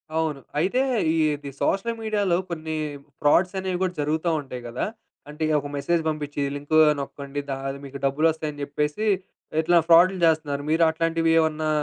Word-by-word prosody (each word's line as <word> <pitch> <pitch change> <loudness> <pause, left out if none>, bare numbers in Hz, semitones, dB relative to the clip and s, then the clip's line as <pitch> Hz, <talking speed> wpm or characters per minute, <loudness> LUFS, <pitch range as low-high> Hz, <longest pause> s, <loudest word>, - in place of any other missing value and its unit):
అవును. 160 -3 0 0.2
అయితే 195 +11 +2 0.3
ఈది 150 -3 0
సోషల్ 230 +4 0
మీడియాలో 205 -5 +1
కొన్ని 160 -2 -4 0.5
ఫ్రాడ్స్ 180 +6 +3
అనేవి 185 -1 -2
కూడా 185 -1 0
జరుగుతా 155 +3 0
ఉంటాయి 130 -3 -8
కదా! 120 +1 -3 0.4
అంటే 150 +2 -3
ఒక 145 - -6
మెసేజ్ 165 +4 0
పంపించి 145 -2 -3
లింకు 145 +2 0 0.2
నొక్కండి 140 0 -5 0.3
అది 135 0 -6
మీకు 140 0 -7
డబ్బులొస్తాయి 155 +2 +1
అని 145 0 -10
చెప్పేసి 150 +7 -2 0.6
ఇట్లా 175 +2 +3
ఫ్రాడ్‌లు 180 +3 +6
చేస్తున్నారు. 155 -3 +1
మీరు 165 +2 +3
అట్లాంటివేమన్నా 160 -1 +1
155 Hz, 140 wpm, -24 LUFS, 145-170 Hz, 0.6 s, ఫ్రాడ్‌లు